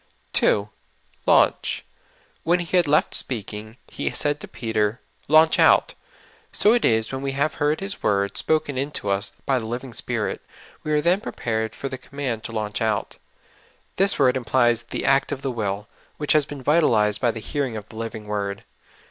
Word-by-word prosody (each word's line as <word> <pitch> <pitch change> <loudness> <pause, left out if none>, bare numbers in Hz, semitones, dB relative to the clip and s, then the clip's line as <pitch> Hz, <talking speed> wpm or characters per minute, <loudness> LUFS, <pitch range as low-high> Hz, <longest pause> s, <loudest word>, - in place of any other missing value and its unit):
2. 100 0 +3 0.6
''Launch.'' - - +3 0.6
When 175 +2 +2
He 175 +1 -2
had 175 -3 +4
left 150 +1 +2
speaking, 110 -1 -3
He - - -3
said 145 0 0
to - - -9
Peter, 110 -1 -1
" - - -41
Launch 155 +2 +5
out. - - +5 0.6
So 210 - +4
it 240 - +2
is 110 -1 +2
when 135 0 -4
we 135 0 -2
have 145 +3 -1
lieard 150 +2 +1
His 195 +1 -2
w^ord 100 -1 0
spoken 145 -4 0
into 140 -7 -3
us, 100 0 0
by 135 -2 +2
the 110 - -6
living 120 +2 -5
Spirit, - - -3 0.4
we 155 - -3
are 150 0 +3
then 180 +5 +2
prepared 110 - -3
for 135 - -5
the 130 -1 -6
command 130 -6 -4
to - - -5
launch 105 -2 -3
out. 110 -2 -1 0.8
This 195 +1 +3
word 130 -3 +4
implies 120 -2 +2
the 120 - -5
act 135 +2 +3
of 140 -2 -4
the 135 - -1
will, 105 -3 -3 0.3
which 150 - +2
has 150 -2 +3
been 140 -3 -8
vitalized 115 -9 +3
by 125 - +3
the 115 - -3
hearing 130 0 -3
of 105 -1 -8
the - - -13
living 115 -1 -5
w^ord. 100 -1 -3
125 Hz, 185 wpm, -23 LUFS, 110-145 Hz, 0.8 s, Launch